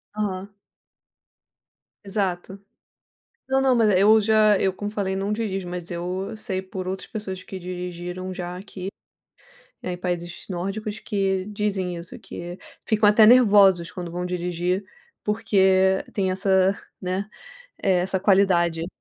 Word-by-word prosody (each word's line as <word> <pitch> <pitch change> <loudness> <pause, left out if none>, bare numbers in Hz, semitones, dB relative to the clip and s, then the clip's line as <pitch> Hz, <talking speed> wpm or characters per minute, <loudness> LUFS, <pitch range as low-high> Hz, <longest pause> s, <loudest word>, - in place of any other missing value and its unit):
Aham. 200 -1 -3 1.5
Exato. 195 -1 -2 0.9
Não, 265 0 +3
não, 265 -1 +3
mas 225 -3 +4
eu 215 +3 +6
já 215 -1 +4
eu, 190 - +2
como 205 +2 -5
eu 210 - -11
falei, 190 -2 -1
não 195 +2 -1
dirijo, 195 -5 -3
mas 175 -1 -6
eu 180 +4 -4
sei 190 -4 -2
por 185 -1 -6
outras 190 0 -4
pessoas 190 -4 -5
que 190 - -7
dirigiram 180 +1 -5
já, 180 -1 -5
aqui, 190 0 -7 0.9
eh, 180 - -3
em - - -6
países 175 -1 -4
nórdicos, 195 +4 -3
que 195 -3 -1
dizem 200 -4 -2
isso, 170 0 -9
que 175 +1 -8 0.3
ficam 215 -2 +3
até 215 +1 +7
nervosos 200 -7 +6
quando 175 -3 -6
vão 180 +1 -3
dirigir, 180 +1 -1 0.4
porque 190 -3 +3
tem 190 -2 0
essa, 190 0 +3 0.3
né, 185 +3 -3 0.5
eh, 185 -2 +3
essa 190 +1 -1
qualidade. 175 -4 +3
190 Hz, 140 wpm, -24 LUFS, 180-205 Hz, 1.5 s, até